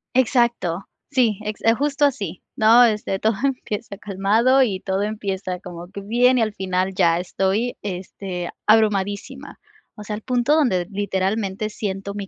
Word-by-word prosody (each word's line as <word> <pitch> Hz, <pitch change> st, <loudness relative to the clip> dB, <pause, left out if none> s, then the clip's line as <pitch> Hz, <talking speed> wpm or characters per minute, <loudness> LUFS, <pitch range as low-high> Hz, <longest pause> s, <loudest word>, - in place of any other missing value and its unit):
Exacto, 235 Hz, -8 st, +1 dB, 0.2 s
sí, 230 Hz, -6 st, +2 dB
ex 210 Hz, 0 st, -5 dB
justo 290 Hz, +2 st, +1 dB
así, 200 Hz, -, -2 dB
¿no?, 225 Hz, +3 st, +6 dB
este, 210 Hz, -3 st, 0 dB
todo 220 Hz, +3 st, +1 dB
empieza 220 Hz, -6 st, -3 dB
calmado 210 Hz, +6 st, +2 dB
y 205 Hz, -7 st, +1 dB
todo 190 Hz, 0 st, -2 dB
empieza 195 Hz, -3 st, -3 dB
como 175 Hz, -2 st, -9 dB
que 200 Hz, -, -7 dB
bien 245 Hz, +5 st, +3 dB
y 230 Hz, -, +3 dB
al 215 Hz, -1 st, -2 dB
final 185 Hz, 0 st, -1 dB
ya 170 Hz, -2 st, +3 dB
estoy, 195 Hz, +6 st, -1 dB
este, 185 Hz, -2 st, -5 dB, 0.2 s
abrumadísima. 205 Hz, -2 st, +1 dB, 0.4 s
O 210 Hz, -, -9 dB
sea, 210 Hz, -, -5 dB
al 215 Hz, -, -7 dB
punto 250 Hz, +4 st, +1 dB
donde 235 Hz, -, +2 dB
literalmente 200 Hz, +1 st, -1 dB
siento 200 Hz, -1 st, -4 dB
mi 200 Hz, -1 st, -6 dB
205 Hz, 150 wpm, -22 LUFS, 190-235 Hz, 0.4 s, no